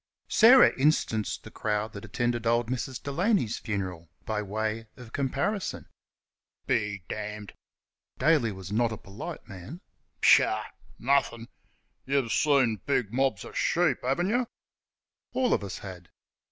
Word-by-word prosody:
Sarah 245 +3 +7
instanced 130 -7 +1
the - - -11
crowd 105 0 -2
that 100 - -8
attended 120 +1 -1
old 120 0 +2
Mrs. 130 0 -4
Delaney's 165 - +1
funeral 95 -6 -4 0.2
by 110 -1 -1
way 110 +2 -3
of 120 -2 -12
comparison. 145 +9 -2 0.8
"Be 105 -6 -1
damned!" 105 -1 -6 0.6
(Daly 135 -5 +3
was 95 -1 -8
not 115 +2 +2
a 110 - -4
polite 100 0 -8
man). 100 - -9 0.4
"Pshaw! - - +5 0.3
Nothing!... 120 -3 +1 0.6
You've 135 -4 +1
seen 130 - +3
big 125 -6 0
mobs 135 +1 0
of - - -11
sheep, 170 -6 +2
haven't 135 +9 0
y'?" 245 +2 +1 0.9
(All 260 -1 +2
of - - 0
us 100 - -5
had.) 90 -3 -10
120 Hz, 130 wpm, -28 LUFS, 105-140 Hz, 0.9 s, Sarah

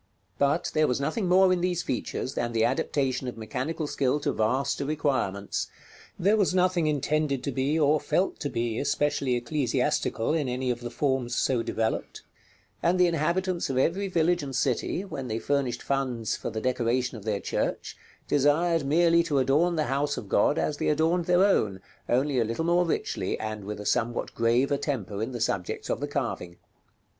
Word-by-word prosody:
But 140 0 +1
there 155 -1 +3
was 125 - 0
nothing 165 +7 -1
more 185 0 +5
in 180 - -1
these 175 -1 0
features 130 +1 -3
than 120 0 -2
the 115 -1 +3
adaptation 130 0 0
of 125 - -5
mechanical 130 +8 -3
skill 140 -1 0
to - - 0
vaster 130 +6 0
requirements; 135 -9 -1 0.5
there 200 +4 +3
was 195 -3 +2
nothing 180 -3 +2
intended 150 -2 0
to 140 - -2
be, 135 +4 0
or 150 0 +3
felt 190 +5 0
to 145 - -2
be, 115 -2 -2
especially 140 -3 0
ecclesiastical 120 -1 0
in 150 -5 0
any 125 0 -1
of 120 - -3
the 120 0 -5
forms 130 -2 -1
so 125 -3 +1
developed; 115 -1 -2 0.6
and 180 +2 +2
the 180 - +6
inhabitants 175 +2 0
of 130 - -1
every 185 +9 +1
village 175 -1 +2
and 135 -2 -5
city, 140 - 0
when 140 -8 -6
they 110 -1 -2
furnished 125 0 -1
funds 125 -5 -1
for - - -5
the 110 -1 -4
decoration 125 0 0
of 110 - -9
their 105 -2 -1
church, - - -2 0.3
desired 155 +3 +2
merely 170 +4 +4
to 160 -4 -1
adorn 150 +7 +3
the 155 - +1
house 145 +2 -1
of 105 - -6
God 100 +9 +2
as 150 - 0
they - - -1
adorned 165 +3 +2
their 180 +2 +4
own, 105 - +1 0.3
only 130 +2 +2
a - - +3
little 115 +8 -2
more 175 +1 +3
richly, - - -2
and 110 -2 -5
with 105 0 -5
a 105 - -7
somewhat 120 +1 -1
graver 120 +5 +2
temper 110 -8 -3
in 115 +4 -2
the 120 - -5
subjects 95 -5 -2
of - - -1
the 145 - -3
carving. 120 -11 -3
140 Hz, 185 wpm, -27 LUFS, 120-160 Hz, 0.6 s, the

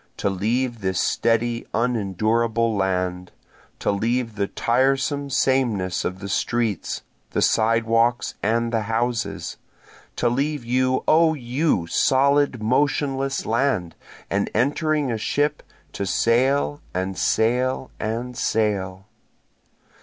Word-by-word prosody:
To 100 - 0
leave 115 +5 -1
this 95 -1 -1
steady 115 +1 0
unendurable 115 0 +1
land, 90 -2 -1 0.5
To - - 0
leave 115 +3 -1
the 100 -1 -1
tiresome 135 +5 +1
sameness 125 -9 +1
of 90 - -3
the 100 +1 -7
streets, 110 0 -1 0.3
the - - +1
sidewalks 115 +1 +2
and 115 +2 0
the 115 - +1
houses, 115 +2 -2 0.6
To 120 - +1
leave 140 +2 -1
you 130 +2 +1
O 160 0 +4
you 125 - 0
solid 135 +4 +2
motionless 135 +2 0
land, 115 -8 0 0.3
and 100 +1 -1
entering 145 +3 +1
a 115 - -2
ship, 145 +6 0 0.3
To 100 - -3
sail 135 +8 +2
and 95 +1 -2
sail 125 +6 +1
and 120 +3 -3
sail! 100 -4 -1
115 Hz, 110 wpm, -23 LUFS, 105-130 Hz, 0.6 s, O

